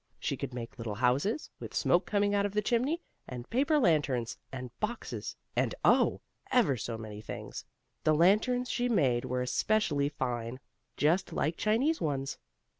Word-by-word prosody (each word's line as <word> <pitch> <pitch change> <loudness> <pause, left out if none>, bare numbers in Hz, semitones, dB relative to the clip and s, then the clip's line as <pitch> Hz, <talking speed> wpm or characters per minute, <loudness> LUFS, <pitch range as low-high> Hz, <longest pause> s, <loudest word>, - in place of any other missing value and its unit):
She - - -1
could - - -5
make 120 -1 -7
little 110 -3 -3
houses, 130 - +1
with - - -8
smoke - - +3
coming 205 -1 +2
out 200 0 +3
of 200 -1 -1
the 210 - +3
chimney, 260 - +1 0.2
and 125 -1 -7
paper 285 +5 +3
lanterns, 145 - +2 0.2
and 125 -2 -6
boxes, 225 +2 -4 0.2
and, - - +1
oh! - - +4 0.3
ever 215 - +4
so 115 0 -4
many 105 -1 -7
things. - - -7 0.4
The 155 - +4
lanterns 215 +9 +3
she 245 0 0
made 130 - +2
were 125 0 -1
especially 145 -1 +1
fine, 125 -3 -3 0.4
just 170 +6 +2
like 160 +2 0
Chinese 250 - +1
ones. 135 -3 -2
155 Hz, 160 wpm, -31 LUFS, -, 0.4 s, oh